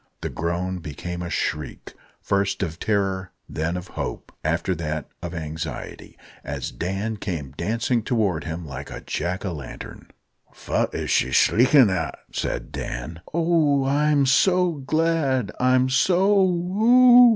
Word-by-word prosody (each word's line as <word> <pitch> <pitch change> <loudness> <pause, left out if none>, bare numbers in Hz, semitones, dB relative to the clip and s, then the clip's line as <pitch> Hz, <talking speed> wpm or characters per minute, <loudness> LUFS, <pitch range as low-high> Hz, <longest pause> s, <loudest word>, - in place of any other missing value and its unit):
The - - -3
groan 90 +3 -2
became 85 +3 -6
a 85 - -4
shriek, 75 -3 -3 0.3
first 100 0 0
of 80 -2 -4
terror, 95 -3 -1
then 80 +3 -2
of 90 0 -8
hope, - - -5
after 95 - 0
that 75 -2 -3
of 85 0 -5
anxiety, 80 -5 -6 0.3
as - - -4
Dan 95 - -3
came 80 -10 -4
dancing 115 - 0
towards 105 - 0
him 80 +1 -5
like 70 -1 -7
a - - -7
Jack 90 +3 -3
o' 95 - -2
lantern. 70 -6 -9 0.4
"Fat - - -1
is - - -2
she - - +3
shriekin' 125 - +5
at?" 80 -4 -2
said - - -3
Dan. 75 +8 -5
"Oh! 160 -5 +2
I'm 145 +1 +3
so 180 +6 +4
glad 150 -5 0
I'm 130 0 +4
so 180 +9 +3
o 190 -1 +5
ow 180 0 -2
hoo!" 245 +1 +8
100 Hz, 145 wpm, -24 LUFS, -, 0.4 s, hoo